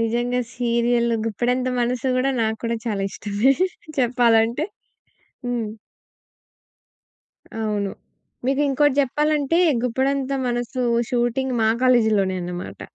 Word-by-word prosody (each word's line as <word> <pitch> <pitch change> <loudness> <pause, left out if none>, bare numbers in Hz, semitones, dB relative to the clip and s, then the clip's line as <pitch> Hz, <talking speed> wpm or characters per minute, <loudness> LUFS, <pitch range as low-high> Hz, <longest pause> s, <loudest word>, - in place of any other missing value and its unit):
నిజంగా 240 +2 0 0.2
సీరియల్ 235 0 +1
'గుప్పెడంత 250 +4 0
మనసు' 250 +2 0
గూడా, 260 +2 +2
నాకు 220 0 -1
కూడా 230 0 0
చాలా 205 -4 -1
ఇష్ట‌మే 210 +6 +1 0.5
చెప్పాలంటే. 240 +2 +3 0.8
హ్మ్. 235 -3 -2 1.9
అవును. 205 -2 -1 0.5
మీకింకోటి 280 +1 +2
జెప్పాలంటే 295 +3 +1 0.2
'గుప్పెడంత 265 +2 0 0.2
మనసు' 240 +1 -2 0.2
షూటింగ్ 245 +1 0
మా 220 - +4
కాలేజులోనే 220 -7 +3
అనమాట. 175 0 -6
240 Hz, 95 wpm, -22 LUFS, 225-260 Hz, 1.9 s, మా